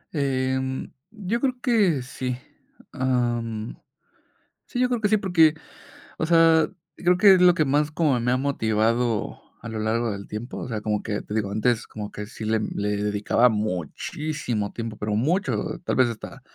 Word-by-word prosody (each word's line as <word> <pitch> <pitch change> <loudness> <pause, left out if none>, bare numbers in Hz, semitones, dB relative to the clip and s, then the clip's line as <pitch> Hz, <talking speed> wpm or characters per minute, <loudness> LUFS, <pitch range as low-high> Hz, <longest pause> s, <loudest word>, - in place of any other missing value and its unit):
Em, 130 -1 -1 0.2
yo 215 +1 -3
creo 255 -2 0
que 200 - +2
sí. 125 -2 -4 0.5
Am, 120 -3 -1 0.9
sí, 245 - -4
yo 250 - +3
creo 240 -3 -1
que 210 - +3
sí, 215 - +4
porque, 165 -6 +4 0.6
o 160 - -1
sea, 165 -1 +5 0.3
creo 180 0 +2
que 195 -1 +8
es 180 - +3
lo 180 -1 +7
que 155 - +2
más 145 +2 +1
como 150 -6 +1
me 125 +1 0
ha 125 - +3
motivado 115 -3 0 0.2
a 115 - -7
lo 110 -1 -4
largo 115 +1 0
del 100 0 -7
tiempo, 110 +4 -6
o - - -5
sea, 110 -3 -3
como 105 -1 -1
que, 105 -2 -3
te 105 - -7
digo, 105 -3 -1
antes 110 +3 0
como 105 -1 -7
que 105 0 -6
sí 110 - -8
le 110 0 +1
le 105 -1 -2
dedicaba 105 +4 +2
muchísimo 110 - -3
tiempo, 115 -2 -5
pero 105 0 -2
mucho, 170 - 0
tal - - -1
vez 130 -2 +4
hasta 115 - -8
125 Hz, 180 wpm, -24 LUFS, 110-160 Hz, 0.9 s, que